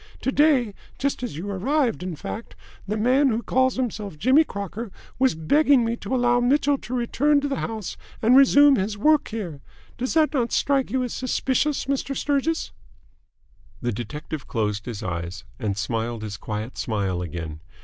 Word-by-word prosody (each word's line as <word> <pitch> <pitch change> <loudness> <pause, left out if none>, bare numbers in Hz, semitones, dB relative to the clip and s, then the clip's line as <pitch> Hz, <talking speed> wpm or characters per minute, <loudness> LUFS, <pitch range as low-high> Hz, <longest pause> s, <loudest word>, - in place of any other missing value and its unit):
To 265 - 0
day 270 -7 +3 0.2
just 280 -1 -1
as 245 -12 -4
you 180 +5 -5
arrived 240 +5 0
in 180 -2 -4
fact 220 +9 -7 0.3
the 210 +2 -1
man 260 +6 +3
who 230 0 -1
calls 260 0 +2
himself 215 -8 -3
Jimmy 260 - +5
Crocker 200 - -6 0.3
was 260 -6 +3
begging 265 - +3
me 230 +1 0
to 240 +5 -3
allow 245 -1 +3
Mitchell 280 +3 +2
to 250 - -5
return 285 +5 +2
to 285 - -1
the 275 - -2
house 220 -5 -4 0.2
and 235 +3 +4
resume 275 +1 +7
his 205 +1 -2
work 300 +7 +3
here. 180 -10 -5 0.4
Does 255 +5 -2
that 315 -1 +3
not 240 -4 0
strike 275 -2 +2
you 260 -1 0
as 245 - -4
suspicious, 260 +3 0
Mr. 275 0 -2
Sturgis?" 290 +3 0 1.1
The 120 - -1
detective 145 +6 -6
closed 105 -1 -2
his 115 -2 -5
eyes, 90 0 -4 0.2
and 100 -3 -2
smiled 115 +2 -2
his 105 -2 -5
quiet 110 +4 -5
smile 100 -5 -1
again. 80 -2 -6
235 Hz, 170 wpm, -24 LUFS, -, 1.1 s, resume